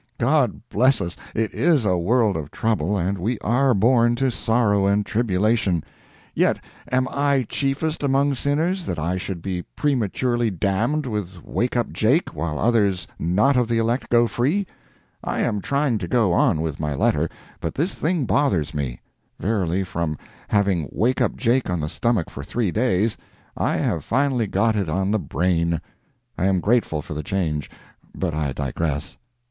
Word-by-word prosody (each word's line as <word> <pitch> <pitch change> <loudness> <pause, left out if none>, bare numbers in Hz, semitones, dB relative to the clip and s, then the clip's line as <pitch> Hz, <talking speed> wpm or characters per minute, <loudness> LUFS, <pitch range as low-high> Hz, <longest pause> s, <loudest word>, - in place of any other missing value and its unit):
God 135 +1 +2
bless 130 +3 +3
us! 85 0 -4 0.2
it 110 -1 -1
is 155 -7 +2
a 95 -2 +3
world 105 +4 +2
of 75 -2 -4
trouble, 105 -3 0
and 95 +2 -1
we 110 +7 -1
are 125 +3 +2
born 120 +3 +4
to 130 +1 +1
sorrow 110 -4 +2
and 100 +1 +2
tribulation—yet, 105 -4 -1 0.3
am 130 0 +2
I 140 -2 +1
chiefest 145 +3 -1
among 140 0 +2
sinners, 160 +7 0
that 85 - -2
I 85 +4 -1
should 90 -2 -5
be 95 -2 -2
prematurely 120 -3 0
damned 105 - 0
with 100 -7 -5
"Wake 120 +1 -1
up 120 - 0
Jake," 130 +11 +2
while 75 0 -2
others 100 -4 +2
not 105 - +2
of 125 -2 +2
the 115 0 0
elect 115 +2 0
go 120 0 +5
free? 145 - 0 0.6
I - - -1
am 105 - 0
trying 140 -4 0
to 90 - -4
go 110 -4 +2
on 80 -2 +3
with 80 -3 -3
my 75 -2 -2
letter, 75 +4 +1 0.3
but 80 - -4
this 170 +6 0
thing 160 -3 0
bothers 90 - +1
me; 70 -5 -3 0.4
verily, 95 -3 0
from 85 -4 -3 0.3
having 100 -7 +1
"Wake 125 +5 +1
up - - +1
Jake" 125 -1 +1
on 90 -1 -1
the 75 0 -2
stomach 100 +2 0
for 70 - -7
three 110 +4 -1
days, 110 -1 +1 0.4
I - - 0
have - - -1
finally 130 -3 +1
got 115 +2 +1
it 100 -6 -1
on 95 +5 0
the 110 - +2
brain. 85 -3 0 0.6
I 95 - +2
am 95 -1 +2
grateful 100 -7 +1
for - - -7
the 75 - -3
change. 75 -3 -2 0.5
But 90 -4 -1
I 75 -2 -1
digress. 75 +2 -3
105 Hz, 170 wpm, -23 LUFS, 85-125 Hz, 0.6 s, go